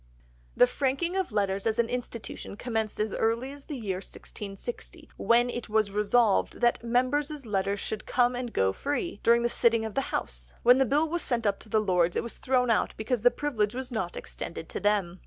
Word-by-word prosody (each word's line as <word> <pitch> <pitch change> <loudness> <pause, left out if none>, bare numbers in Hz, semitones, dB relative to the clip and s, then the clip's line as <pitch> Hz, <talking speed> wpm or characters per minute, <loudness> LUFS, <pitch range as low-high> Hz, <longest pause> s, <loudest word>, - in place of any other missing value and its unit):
"The - - +8
franking 275 +7 -1
of 380 -7 -1
letters 200 -1 0
as 220 0 0
an 235 -1 +2
institution 235 -4 -5
commenced 225 -3 -2
as 215 0 0
early 230 +4 0
as 285 0 -11
the 295 - -5
year 200 -6 -3
1660, 215 - -8
when 235 +3 +3
it 240 -2 -5
was 215 -1 +2
resolved 210 +1 +2
that 240 -1 +2
members' 270 +4 0
letters 200 -1 -1
should 215 +1 -4
come 245 0 +2
and 245 -1 -4
go 95 - +2
free, 290 - -3
during 235 +1 +4
the - - +3
sitting 230 -1 +3
of 220 - -5
the 275 - -1
House. - - -4
When 250 +2 +7
the 270 - +4
Bill 295 +6 +2
was 345 +2 -1
sent 235 -3 -1
up 200 -1 +1
to 220 - -12
the 215 - +3
Lords, 180 -4 +2
it - - 0
was 235 - -6
thrown 250 -2 +2
out 220 - +1
because 220 +1 -1
the 245 - +6
privilege 235 -7 -1
was 260 0 -5
not 190 -7 -3
extended 165 -1 -7
to - - -4
them. 200 -4 0
230 Hz, 210 wpm, -28 LUFS, 205-255 Hz, -, The